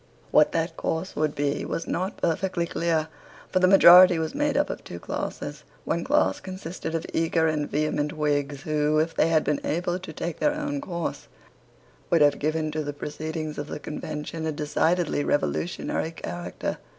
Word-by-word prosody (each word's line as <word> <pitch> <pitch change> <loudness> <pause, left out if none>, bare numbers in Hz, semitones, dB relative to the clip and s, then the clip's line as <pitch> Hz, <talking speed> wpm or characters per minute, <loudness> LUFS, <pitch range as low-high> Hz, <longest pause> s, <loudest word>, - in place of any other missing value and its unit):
What 150 - +5
that 165 0 -1
course 165 +4 -2
would 155 -1 0
be 145 0 -1
was 165 - -3
not 185 +3 -2
perfectly 175 +1 0
clear. 165 -2 0 0.4
For 185 - +3
the 185 - +5
majority 180 -1 +9
was 160 -1 -2
made 290 -1 0
up 290 - +1
of - - -7
two - - -8
classes. - - -5 0.2
One - - -1
class - - +2
consisted 180 -3 -6
of 165 - -2
eager 165 0 +2
and 155 -2 0
vehement 150 0 0
Whigs, 145 -2 -1
who, 150 0 +1
if 160 +2 +1
they - - +3
had 160 -2 +3
been 150 0 0
able 175 +2 -1
to 185 -3 -8
take 165 +1 -5
their 295 0 +2
own 290 -1 -3
course, 170 - -4 0.8
would 170 -2 +3
have 145 -1 +4
given 155 +1 -1
to 155 0 -2
the 145 0 -4
proceedings 155 +1 -5
of 145 - -4
the - - -5
Convention 155 +1 -5
a - - 0
decidedly 155 +1 0
revolutionary 160 +2 -1
character. 85 - -5
160 Hz, 175 wpm, -26 LUFS, 150-175 Hz, 0.8 s, majority